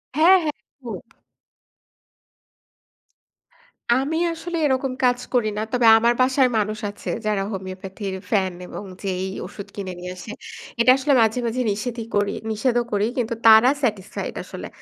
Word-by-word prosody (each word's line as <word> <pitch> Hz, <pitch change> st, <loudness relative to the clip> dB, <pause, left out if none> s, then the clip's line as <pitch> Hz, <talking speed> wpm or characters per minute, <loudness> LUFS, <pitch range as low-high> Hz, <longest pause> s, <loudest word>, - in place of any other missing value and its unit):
হ্যা, 315 Hz, +3 st, +4 dB, 0.2 s
হ্যা, 300 Hz, -, 0 dB
একদম। 250 Hz, -5 st, -9 dB, 3.0 s
আমি 280 Hz, +5 st, 0 dB, 0.2 s
আসলে 340 Hz, +1 st, -5 dB
এরকম 265 Hz, -1 st, +1 dB
কাজ 245 Hz, 0 st, +3 dB
করি 240 Hz, -3 st, +2 dB
না। 215 Hz, -, -1 dB
তবে 245 Hz, -2 st, +2 dB
আমার 235 Hz, +1 st, +3 dB
বাসায় 260 Hz, 0 st, +4 dB
মানুষ 215 Hz, 0 st, -1 dB
আছে, 205 Hz, -, -8 dB, 0.2 s
যারা 210 Hz, -2 st, +1 dB
হোমিওপ্যাথির 190 Hz, 0 st, -6 dB
ফ্যান 190 Hz, -4 st, +1 dB
এবং -, -, -7 dB, 0.2 s
যেয়েই 190 Hz, 0 st, -2 dB
ঔষুধ 200 Hz, +2 st, -9 dB
কিনে 195 Hz, -2 st, -5 dB
নিয়ে 180 Hz, 0 st, -6 dB
আসে। 210 Hz, -, -8 dB, 0.5 s
এটা 235 Hz, +2 st, +6 dB
আসলে 280 Hz, +2 st, +1 dB
মাঝে, 220 Hz, +2 st, +2 dB
মাঝে 250 Hz, +3 st, -1 dB
নিষেধই 230 Hz, +2 st, -4 dB
করি, 205 Hz, 0 st, +2 dB, 0.2 s
নিষেধও 240 Hz, +2 st, +1 dB
করি; 205 Hz, 0 st, +1 dB
কিন্তু 230 Hz, -1 st, -1 dB
তারা 220 Hz, +2 st, +8 dB
স্যাটিসফাইড 210 Hz, -7 st, -2 dB
আসলে। -, -, -8 dB
220 Hz, 140 wpm, -22 LUFS, 200-255 Hz, 3.0 s, তারা